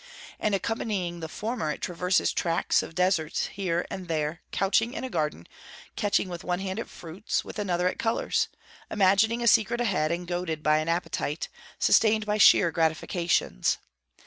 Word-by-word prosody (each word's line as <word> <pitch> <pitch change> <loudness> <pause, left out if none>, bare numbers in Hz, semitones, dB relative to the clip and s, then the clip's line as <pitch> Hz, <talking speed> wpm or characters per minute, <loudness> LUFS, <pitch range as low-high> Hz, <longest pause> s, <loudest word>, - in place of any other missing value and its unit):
and 210 -2 +1
accompanying 195 -5 -2
the 160 -1 -6
former 220 -3 -3
it 150 - -3
traverses 180 +1 0
tracts 165 -1 +1
of 165 - -9
desert 180 -4 0
here 175 -3 -1
and 185 -2 -6
there 155 0 -2
couching 225 +5 +1
in - - -4
a 260 - -5
garden, 150 - -2 0.5
catching 205 -2 +1
with 175 -2 -7
one 180 0 -1
hand 190 +2 -3
at - - -5
fruits, 175 +5 -4
with - - -7
another 180 -3 0
at - - -2
colours; 225 0 0 0.4
imagining 210 +4 +3
a - - +1
secret 230 +1 +4
ahead, 185 -10 +1
and 175 +1 -2
goaded 175 -3 -3
by 155 0 +4
an 155 +1 -2
appetite, 165 -2 -2 0.3
sustained 220 -1 +4
by 210 0 0
sheer 175 -4 +6
gratifications. 165 - 0
180 Hz, 165 wpm, -27 LUFS, 165-210 Hz, 0.5 s, sheer